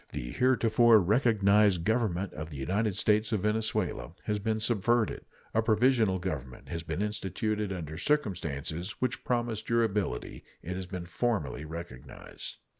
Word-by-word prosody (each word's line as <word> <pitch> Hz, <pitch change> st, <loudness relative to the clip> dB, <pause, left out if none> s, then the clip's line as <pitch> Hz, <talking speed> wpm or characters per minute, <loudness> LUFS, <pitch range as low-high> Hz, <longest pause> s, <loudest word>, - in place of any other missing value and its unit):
The -, -, -4 dB
heretofore 120 Hz, -, +5 dB
recognized 105 Hz, -3 st, +3 dB
Government 100 Hz, -3 st, 0 dB
of 75 Hz, +1 st, -6 dB
the 75 Hz, -, -8 dB
United 100 Hz, +9 st, 0 dB
States 105 Hz, +1 st, +2 dB
of 110 Hz, -4 st, +1 dB
Venezuela 105 Hz, -5 st, -1 dB
has 105 Hz, -1 st, -1 dB
been 110 Hz, +1 st, -1 dB
subverted. 115 Hz, 0 st, +1 dB, 0.3 s
A 110 Hz, -, +3 dB
provisional 110 Hz, -2 st, +3 dB
government 75 Hz, -8 st, -5 dB
having 85 Hz, 0 st, -5 dB
been 80 Hz, +4 st, -2 dB
instituted 105 Hz, 0 st, -2 dB
under 80 Hz, -4 st, -5 dB
circumstances 90 Hz, -, -1 dB
which 130 Hz, -, -2 dB
promise 120 Hz, -3 st, 0 dB
durability, 110 Hz, -3 st, -1 dB, 0.2 s
it 90 Hz, +2 st, -4 dB
has 95 Hz, -1 st, -5 dB
been 90 Hz, -2 st, -5 dB
formally 85 Hz, -, -1 dB
recognized. 80 Hz, -5 st, -8 dB
105 Hz, 135 wpm, -30 LUFS, 85-110 Hz, 0.3 s, heretofore